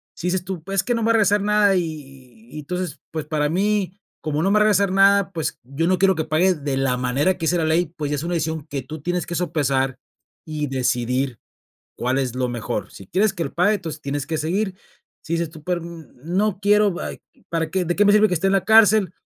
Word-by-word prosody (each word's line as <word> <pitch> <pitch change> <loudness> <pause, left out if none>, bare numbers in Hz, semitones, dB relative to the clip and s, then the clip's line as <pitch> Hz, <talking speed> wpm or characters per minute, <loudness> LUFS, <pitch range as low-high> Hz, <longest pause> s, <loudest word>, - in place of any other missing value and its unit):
Si 175 - -4
dices 180 0 0
tú: 180 -3 -6
"Pues, 195 +3 -5
es - - +3
que 245 - 0
no 230 - -1
me 225 - +1
va - - +4
a - - +3
regresar 205 -2 +3
nada, 205 -1 +3
y 180 - +2
y 135 -7 -10
y - - -4
entonces, 180 +4 -4
pues, 155 -1 -4
para 150 -1 0
mí, 195 +1 0 0.2
como 155 0 -1
no 195 - +2
me - - +3
va - - +5
a - - +6
regresar 200 -2 +3
nada, 195 0 +4
pues, 160 -6 -3
yo 140 +7 -2
no 185 +1 +3
quiero 190 0 +3
que 160 -1 -2
pague 165 +4 +3
de 140 -3 -3
la 135 -2 +1
manera 130 +8 +1
que 165 - -4
dice 175 +2 +2
la 165 - 0
ley". 160 +2 +2
Pues, 150 -2 -3
ya - - +1
es 145 - -4
una 175 +1 -2
decisión 160 -2 -2
que 140 -2 -4
tú 155 +3 -8
tienes 175 +3 -2
que 175 - -5
sopesar 140 -6 0 0.5
y 150 -2 -3
decidir 125 -1 -1 0.6
cuál 125 +2 0
es 130 -3 -2
lo 130 0 -1
mejor. 120 -2 -4
Si 95 - -12
quieres 195 - +1
que 170 - -3
lo - - -6
pague, 180 +5 +3
entonces 165 -6 -5
tienes 140 -1 -3
que 160 - -2
seguir. 185 +5 -1 0.5
Si 165 - -3
dices 165 -1 -1
tú: 160 -2 -13
"Pero, 175 +1 -2
n 165 -4 -10 0.2
no 190 +4 0
quiero, 205 -2 +3
ay - - -6 0.3
¿Para 165 -1 -2
qué 185 +1 0
de 175 +1 -1
qué 205 - +4
me 205 - +5
sirve 210 +1 +5
que 180 - 0
esté 180 +3 +1
en - - +1
la 195 -2 +2
cárcel?". 220 -3 +5
170 Hz, 260 wpm, -22 LUFS, 145-195 Hz, 0.6 s, a